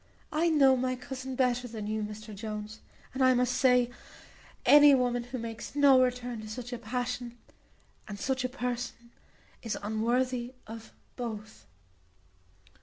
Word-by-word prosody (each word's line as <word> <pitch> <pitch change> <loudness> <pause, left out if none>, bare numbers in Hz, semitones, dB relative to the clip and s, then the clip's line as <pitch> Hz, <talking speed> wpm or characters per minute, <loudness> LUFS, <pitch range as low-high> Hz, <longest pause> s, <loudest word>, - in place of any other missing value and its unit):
I 330 +3 +2
know 275 -4 +5
my 255 0 -1
cousin 260 +1 -6
better 245 -1 +1
than 220 -3 -6
you, 215 +1 -2
Mr 215 +1 -7
Jones, 215 +1 -6 0.3
and 265 0 0
I 255 0 +5
must 250 0 +1
say, 250 -1 +3 0.7
any 290 -1 +8
woman 245 -2 0
who 250 +1 -6
makes 230 +2 -7
no 280 -3 +6
return 245 -2 -1
to 215 - -9
such 245 +3 -6
a 245 - -4
passion, 245 +1 -4 0.7
and 205 - -6
such 260 +1 -1
a 255 - -1
person, 245 -2 -5 0.5
is 225 - -3
unworthy 240 +3 0
of 225 0 -10 0.3
both." 220 -3 -7
245 Hz, 145 wpm, -29 LUFS, 225-255 Hz, 0.7 s, any